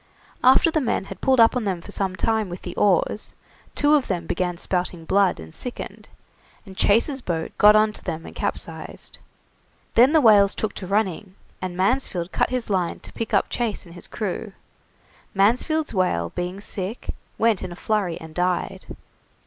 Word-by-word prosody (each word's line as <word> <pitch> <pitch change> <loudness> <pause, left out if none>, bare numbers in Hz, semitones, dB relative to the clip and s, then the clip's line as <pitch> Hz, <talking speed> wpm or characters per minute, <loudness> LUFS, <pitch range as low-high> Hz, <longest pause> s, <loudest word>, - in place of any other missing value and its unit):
After 260 +6 +6
the 315 - +1
men 250 - 0
had - - -10
pulled 260 -2 +3
up 230 +2 +6
on 250 - 0
them 190 -4 -1
for 185 - -10
some 190 -2 -1
time 220 0 0
with 175 +1 -8
the - - -6
oars, 205 +1 +1 0.4
two 290 +1 +3
of 290 -4 +3
them 175 -3 -2
began 175 +1 -2
spouting 180 -2 -2
blood 195 - +2
and 80 0 -10
sickened, 250 - -6 0.6
and 190 -2 -11
Chase's 235 +8 +2
boat 165 -6 -3
got 210 0 +8
on 215 0 +4
to - - -10
them 160 +1 -4
and - - -10
capsized. - - -4 0.7
Then 250 +4 +6
the 320 - +5
whales 205 -6 +6
took 215 -2 -2
to 185 - -7
running, 195 -1 -1 0.3
and 185 -1 -4
Mansfield 190 -4 0
cut - - +1
his 250 -2 -2
line 185 -4 -1
to - - -10
pick 230 0 -4
up 200 - +3
Chase 225 -5 -2
and 170 - -13
his 175 - -10
crew. 210 -1 -4 0.8
Mansfield's 250 +10 +2
whale 85 - 0
being 180 +2 -4
sick, 200 +2 -4 0.2
went 225 -4 +2
in 185 - -5
a - - -7
flurry 195 -3 -1
and 160 -1 -11
died. 180 +1 -2
200 Hz, 180 wpm, -23 LUFS, 180-225 Hz, 0.8 s, got